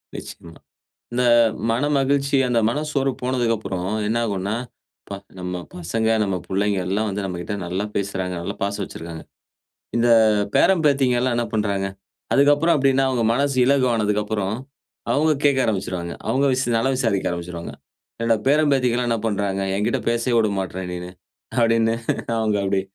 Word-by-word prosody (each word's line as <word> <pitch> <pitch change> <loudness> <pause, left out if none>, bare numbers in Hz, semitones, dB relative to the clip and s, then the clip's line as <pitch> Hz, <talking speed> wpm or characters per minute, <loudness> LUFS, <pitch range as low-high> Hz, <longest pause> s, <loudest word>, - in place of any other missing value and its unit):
நிச்சயமா. 85 -1 -9 0.6
இந்த 125 +1 +1 0.5
மனமகிழ்ச்சி 140 +1 +1
அந்த 120 -1 +2
மனசோர்வு 140 -1 -1
போனதுக்கு 120 -3 +1
அப்புறம், 95 -3 -4 0.2
என்ன 115 +2 0
ஆகுன்னா, 100 0 -2 0.5
அப்பா! 100 - -7 0.2
நம்ம 90 0 -4 0.2
பசங்க, 110 +6 -2 0.2
நம்ம 95 -2 -1
பிள்ளைங்க 100 +1 0
எல்லாம் 105 +3 0
வந்து 100 +1 -3
நம்மக்கிட்ட 90 +2 -4
நல்லா 95 +4 -2
பேசுறாங்க, 95 -2 -2
நல்லா 85 - -4
பாசம் 100 0 -2
வச்சிருக்காங்க. 80 -2 -8 0.7
இந்த 120 +1 +3 0.5
பேரன், 190 -4 +4
பேத்திங்கல்லாம் 130 -3 +2
என்ன 120 -1 0
பண்றாங்க? 100 -2 0 0.5
அதுக்கப்பறம் 145 +4 +4
அப்படின்னா, 135 0 +3
அவுங்க 120 -3 0
மனசு 140 0 0
இலகு 135 -1 +3
ஆனதுக்கு 105 -1 +1
அப்புறம், 105 -2 -2 0.6
அவுங்க 155 +2 +3
கேட்க 140 -2 +4
ஆரம்பிச்சுருவாங்க. 90 -5 -2
அவுங்க 140 +2 +2
விஸ் 130 -1 0
நலம் 130 +3 +1
விசாரிக்க 110 -8 0
ஆரம்பிச்சுருவாங்க. 85 -1 -6 0.5
"என்னோட 115 -1 +3
பேரன், 150 0 +4
பேத்திக்கெல்லாம் 125 -2 +1
என்ன 115 -2 0
பண்றாங்க? 100 -2 -1
என்கிட்ட 105 +2 0
பேசவே 120 +1 +1
விட 110 -2 +1
மாட்ற 95 0 -4
நீன்னு?" 90 0 -6 0.5
அப்பிடின்னு 115 -1 +3 0.4
அவுங்க 110 -2 +1
அப்பிடி 95 0 +1
110 Hz, 145 wpm, -22 LUFS, 95-130 Hz, 0.7 s, பேரன்